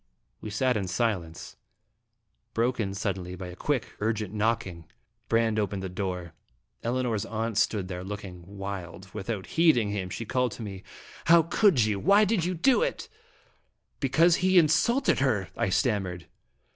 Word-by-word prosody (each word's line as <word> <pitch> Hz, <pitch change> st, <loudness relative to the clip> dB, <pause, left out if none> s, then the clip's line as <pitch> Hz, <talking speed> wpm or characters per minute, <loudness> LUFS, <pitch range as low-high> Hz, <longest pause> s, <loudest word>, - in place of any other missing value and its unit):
We 110 Hz, -, -6 dB
sat 125 Hz, +3 st, +1 dB
in 95 Hz, -2 st, -2 dB
silence, 95 Hz, -5 st, -2 dB, 1.0 s
broken 115 Hz, -4 st, 0 dB
suddenly 95 Hz, -3 st, -3 dB
by 90 Hz, -1 st, -7 dB
a 90 Hz, -, -9 dB
quick, 130 Hz, +4 st, -2 dB
urgent 110 Hz, -2 st, -1 dB
knocking. 105 Hz, -6 st, -1 dB, 0.4 s
Brande 115 Hz, -1 st, +2 dB
opened 100 Hz, -2 st, -2 dB
the 95 Hz, -, -3 dB
door. 90 Hz, -3 st, -4 dB, 0.5 s
Elinor's 120 Hz, -3 st, 0 dB
aunt 115 Hz, 0 st, -3 dB
stood 100 Hz, -2 st, +1 dB
there, 90 Hz, -1 st, -5 dB
looking 95 Hz, -2 st, -7 dB, 0.2 s
wild. 95 Hz, -1 st, -7 dB
Without 105 Hz, -1 st, -4 dB
heeding 140 Hz, -11 st, +3 dB
him, 95 Hz, -3 st, -3 dB
she 115 Hz, -, -5 dB
called 125 Hz, 0 st, 0 dB
to 115 Hz, -, -8 dB
me: 95 Hz, -3 st, -7 dB, 0.4 s
"How 165 Hz, 0 st, +7 dB
could 165 Hz, -, +3 dB
you 105 Hz, -2 st, 0 dB
do -, -, -6 dB
it? -, -, -11 dB
Why 205 Hz, +2 st, +6 dB
did 205 Hz, -4 st, +1 dB
you 180 Hz, +1 st, -1 dB
do 250 Hz, +10 st, +3 dB
it?" -, -, -2 dB, 0.4 s
" -, -, -44 dB
Because 160 Hz, +5 st, +4 dB
he 185 Hz, 0 st, +3 dB
insulted 175 Hz, -, +3 dB
her," 110 Hz, -10 st, +1 dB
I -, -, 0 dB
stammered. 95 Hz, -3 st, 0 dB
110 Hz, 160 wpm, -27 LUFS, 95-130 Hz, 1.0 s, How